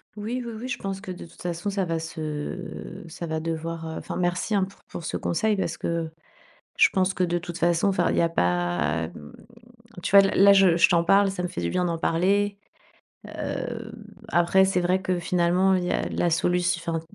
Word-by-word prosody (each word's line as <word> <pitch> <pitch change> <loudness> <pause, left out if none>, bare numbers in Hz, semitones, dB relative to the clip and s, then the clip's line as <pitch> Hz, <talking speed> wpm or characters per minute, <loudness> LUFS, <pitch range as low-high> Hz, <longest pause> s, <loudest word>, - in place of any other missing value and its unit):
Oui, 225 +4 -3
oui, 235 - -6
oui, 250 - -5
je 255 - -3
pense 195 -1 -4
que 190 - -7
de 180 - -8
toute 165 - -17
façon, 175 +3 -3
ça 195 -2 -1
va 165 -1 -1
se 160 +2 -6
ça 170 +1 -7
va 160 0 -2
devoir, 165 0 -4
heu 160 - -5
enfin, - - -6
merci, 180 +4 0
hein, 195 - +3
pour 195 +1 -7
pour 175 - -7
ce - - -3
conseil 215 +4 0
parce 170 -3 -2
que 170 -1 -2 0.7
je - - +6
pense 190 0 +1
que 185 - 0
de 175 0 +1
toute 175 0 -6
façon 170 +3 +2
enfin 190 - +1
il - - -1
y - - +4
a 170 - +2
pas, 85 - 0
mmh, 75 -3 -12 0.7
tu 200 - 0
vois, 195 - +8
l 195 - +1
là 200 - +8
je 190 -4 +5
je 170 - +5
t'en 170 -1 +3
parle, 195 +3 +4
ça 180 -2 -4
me - - 0
fait 85 - -6
du 85 - -1
bien 180 - 0
d'en 170 -1 -1
parler. 200 +5 +1 0.7
Heu, 225 -2 -5 0.4
après, 180 0 +4
c'est 190 -1 +1
vrai 180 +2 +1
que 185 -1 -1
finalement, 180 +2 +2
il 180 -1 0
y 180 - -2
a - - 0
la 175 - 0
solut 175 +2 +1 0.2
enfin, 165 -1 -3
175 Hz, 225 wpm, -25 LUFS, 165-195 Hz, 0.7 s, vois